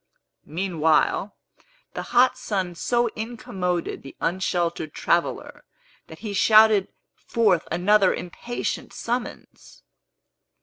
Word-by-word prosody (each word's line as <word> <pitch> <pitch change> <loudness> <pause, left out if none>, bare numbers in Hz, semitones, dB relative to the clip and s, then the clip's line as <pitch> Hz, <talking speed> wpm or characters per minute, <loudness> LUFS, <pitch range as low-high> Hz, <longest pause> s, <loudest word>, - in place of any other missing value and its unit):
Meanwhile, 170 +3 +1 0.6
the - - -4
hot 250 +1 +4
sun 190 -4 -3
so 240 +8 0
incommoded 190 -6 -3
the 135 - -12
unsheltered 170 -3 -1
traveller, 170 0 -1 0.4
that - - -11
he 205 - -3
shouted 215 -1 +5 0.3
forth 205 -8 +1
another 190 +3 +4
impatient 235 +7 -5
summons. 240 +1 -6
190 Hz, 90 wpm, -24 LUFS, 175-220 Hz, 0.6 s, shouted